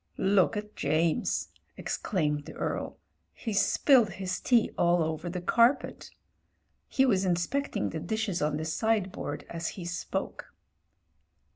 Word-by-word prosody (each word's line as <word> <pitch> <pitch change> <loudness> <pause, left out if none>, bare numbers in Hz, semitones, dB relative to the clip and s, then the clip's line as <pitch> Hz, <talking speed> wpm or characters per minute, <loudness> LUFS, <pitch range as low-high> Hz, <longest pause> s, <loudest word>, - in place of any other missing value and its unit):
"Look 195 +2 +3
at 210 0 -6
James 160 +1 0
!" - - -44
exclaimed 150 -7 -1
the - - -10
Earl - - -3 0.2
— - - -47
"he's 210 -3 +2
spilled 240 -9 +4
his 185 0 -3
tea 240 -3 +3
all 175 -1 +3
over 160 +2 -3
the 180 +1 -4
carpet." 235 +8 +2 0.8
He 265 - +3
was 195 -7 +2
inspecting 180 - -1
the - - -4
dishes 220 -5 -2
on 150 0 0
the 155 - -3
sideboard 190 -4 -1
as 170 0 -4
he 175 - -6
spoke. 180 +1 -5
185 Hz, 140 wpm, -29 LUFS, 165-220 Hz, 0.8 s, spilled